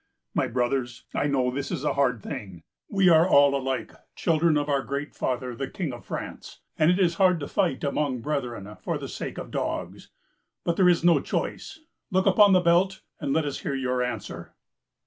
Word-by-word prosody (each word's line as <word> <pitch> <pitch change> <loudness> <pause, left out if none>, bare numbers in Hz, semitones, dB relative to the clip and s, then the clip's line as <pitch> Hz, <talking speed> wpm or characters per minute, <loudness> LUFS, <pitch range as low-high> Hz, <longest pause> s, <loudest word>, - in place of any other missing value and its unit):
My - - +1
brothers, 125 0 -1
I - - 0
know 130 -3 +1
this 140 +2 -4
is 160 -6 -3
a 150 - +1
hard 125 -6 +1
thing. 95 -5 -7 0.3
We 195 -2 +3
are 165 +2 +5
all 140 -3 +6
alike 135 -1 -2 0.2
children 165 -2 +2
of 145 0 -1
our 140 -2 +1
Great 140 +2 -4
Father 125 -1 -2
the 135 +2 -3
King 165 -9 -4
of 120 - -10
France, - - -7 0.2
and 155 - +3
it 180 - +3
is 180 -3 +3
hard 180 -3 +5
to 145 - -5
fight 175 -10 0
among 140 -3 -1
brethren 120 -8 -4
for - - -2
the - - -6
sake - - -6
of - - -7
dogs. - - -4 0.5
But 170 - 0
there 180 -1 +5
is 170 -2 +2
no 170 -1 +5
choice. 320 - -4 0.3
Look 190 -1 +1
upon 200 0 +6
the 185 - +5
belt, 175 +3 +2 0.2
and 140 - -2
let 160 +1 +1
us 145 - -3
hear 140 - -3
your 125 -1 -1
answer." 125 0 -5
145 Hz, 200 wpm, -26 LUFS, 130-170 Hz, 0.5 s, all